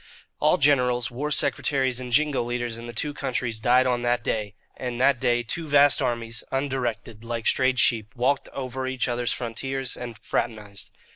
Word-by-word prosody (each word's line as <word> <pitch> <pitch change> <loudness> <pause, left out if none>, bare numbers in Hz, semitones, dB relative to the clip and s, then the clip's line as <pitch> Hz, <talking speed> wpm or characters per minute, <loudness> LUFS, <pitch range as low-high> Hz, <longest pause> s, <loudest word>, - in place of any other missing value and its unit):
All - - +4
generals, 125 -4 +2
war 140 +5 -3
secretaries, 130 -3 +1
and 125 -1 -6
jingo 145 +2 +3
leaders 120 -1 -3
in 120 - -8
the - - -5
two 145 +6 -2
countries 125 -5 -1
died 125 +3 +4
on 125 -1 +1
that 120 -1 +1
day; 105 -2 -2 0.2
and 125 -2 -4
that 130 0 +4
day 120 0 +2
two 160 +8 -3
vast 145 -1 +5
armies, 120 -2 -2
undirected, 120 -5 -2
like 115 -1 -4
strayed 130 -1 +2
sheep, 115 -1 +1
walked 130 +3 +1
over 130 -1 -4
each 130 -1 -1
other's 120 0 0
frontiers 130 +2 -3
and 120 -2 -7
fraternized. 105 -5 -3
125 Hz, 170 wpm, -25 LUFS, 120-135 Hz, 0.2 s, vast